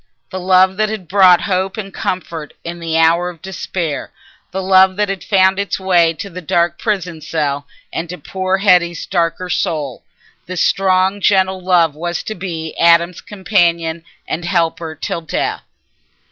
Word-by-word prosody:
The 185 - -4
love 185 +1 +3
that 215 0 +1
had 210 -5 -6
brought 185 -1 +5
hope 190 +1 -1
and 195 -3 -6
comfort 165 -4 -4
in 170 +1 -6
the 165 -1 -1
hour 165 +2 +3
of 175 -2 -11
despair, 170 -4 -4 0.4
the 190 - -4
love 190 0 +5
that 205 0 0
had 195 -2 -4
found 190 -1 +3
its 200 0 -2
way 175 -3 +3
to 200 - -6
the 180 -1 -8
dark 170 +1 0
prison 180 -7 -2
cell 145 -3 -2 0.3
and 165 0 -4
to 180 - -6
poor 190 0 -2
Hetty's 180 -4 +2
darker 175 0 -1
soul—this 165 +1 -4
strong 190 +1 +2
gentle 190 -1 +2
love 175 -4 +3
was 170 +3 -4
to 215 - -4
be 170 -5 -6
Adam's 170 +1 +4
companion 170 -5 0 0.2
and 170 - -3
helper 165 -2 -1
till 165 +2 -4
death. 160 - -2
180 Hz, 160 wpm, -17 LUFS, 165-190 Hz, 0.4 s, brought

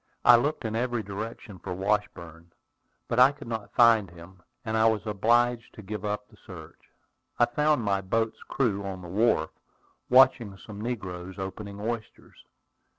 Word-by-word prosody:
I 120 - +9
looked 140 +2 0
in 110 0 -2
every 120 -1 -1
direction 105 0 -7
for 90 - -6
Washburn, 90 -4 -3 0.6
but 115 - 0
I 130 +2 +8
could 145 -2 -12
not 110 -3 -6
find 115 -5 +5
him, 85 +2 -15 0.2
and 110 0 -2
I 110 0 +4
was 110 -1 0
obliged 120 +3 +1
to 110 - -10
give 105 +1 -6
up 105 0 -3
the - - -21
search. - - -13 0.5
I 120 - +5
found 150 +1 +1
my 100 -1 0
boat's 110 +4 -1
crew 105 -7 0
on 95 -2 -6
the - - -8
wharf, 110 +6 +1 0.6
watching 125 -6 +5
some 105 +1 -10
negroes 95 -6 -5
opening 100 +1 -7
oysters. 110 +1 -6
110 Hz, 160 wpm, -27 LUFS, 95-120 Hz, 0.6 s, I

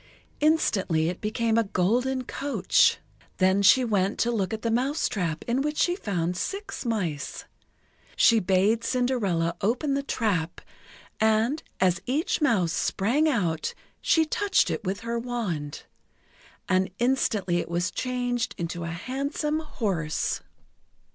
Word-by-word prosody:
Instantly 195 - +2
it 180 - -6
became 225 +1 +1
a - - +3
golden 245 +7 0
coach. 280 +3 +2 0.4
Then 190 +1 +3
she 225 +6 +6
went 200 -3 +1
to 240 - +2
look 205 -4 -1
at 220 -1 -4
the 230 - 0
mousetrap 225 - -1
in 245 +3 +1
which 300 +1 -2
she 350 - +2
found 180 - -2
six 395 - -4
mice. 185 - -3 0.7
She 230 -1 +5
bade 195 +4 +2
Cinderella 230 -10 0
open 250 +8 0
the 280 - 0
trap, 200 -11 -1 0.6
and, 220 +7 +2 0.2
as 180 -1 +2
each 295 +6 0
mouse 195 - +2
sprang 270 +11 +1
out, 175 - -1 0.3
she 320 -1 +3
touched 410 +4 +1
it - - -3
with 195 +1 -3
her 235 0 -2
wand. 205 -12 -4 0.8
And 185 0 +2
instantly 215 -8 +1
it 175 - -3
was 175 +1 -1
changed 245 -2 -2
into 170 0 -4
a - - -4
handsome 280 - -2
horse. 200 - -2
220 Hz, 135 wpm, -26 LUFS, 185-255 Hz, 0.8 s, she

